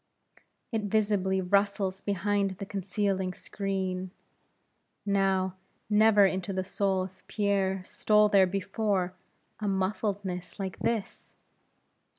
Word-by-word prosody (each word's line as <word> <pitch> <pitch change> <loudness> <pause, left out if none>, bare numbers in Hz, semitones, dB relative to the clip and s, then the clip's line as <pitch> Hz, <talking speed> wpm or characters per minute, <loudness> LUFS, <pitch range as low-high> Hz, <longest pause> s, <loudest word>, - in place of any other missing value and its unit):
It 220 -3 -1
visibly 200 -2 +1
rustles 195 0 +1
behind 200 0 0
the 200 - -5
concealing 195 -1 -1
screen. 190 -2 -3 1.0
Now, 190 -2 +1 0.3
never 210 -1 +6
into 190 0 -1
the 185 -1 -1
soul 190 0 0
of 190 +1 -11
Pierre, 195 -2 0
stole 210 +2 +3
there 195 -2 +5
before, 195 -1 -1 0.5
a 210 - -2
muffledness 190 -2 -2
like 190 -2 -4
this! 220 -4 -3
195 Hz, 105 wpm, -29 LUFS, 190-205 Hz, 1.0 s, never